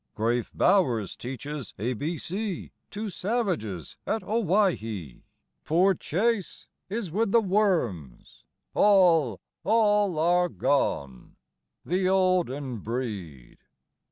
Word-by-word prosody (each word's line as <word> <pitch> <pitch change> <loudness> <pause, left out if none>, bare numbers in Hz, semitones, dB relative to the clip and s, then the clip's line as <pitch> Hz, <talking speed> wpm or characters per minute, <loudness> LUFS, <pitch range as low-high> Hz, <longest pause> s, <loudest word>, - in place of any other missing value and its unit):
IX. - - -51
Grave 115 +2 0
Bowers 120 - +2
teaches 135 0 -6
A 120 +6 -1
B 155 +8 -3
C 195 +2 -4 0.2
To 210 0 -5
savages 180 - -2
at 220 - -1
Owhyee; 175 - 0 0.4
Poor 180 +5 +3
Chase 200 +4 -2 0.2
is 205 -4 -3
with 210 +3 0
the 235 - +6
worms! 180 - -1 0.3
All, 170 - +4 0.2
all 210 -4 +3
are 175 +2 +3
gone 70 - -1 0.5
the 185 +1 +1
olden 175 -9 +1
breed! 100 - -6
170 Hz, 100 wpm, -27 LUFS, -, 0.5 s, the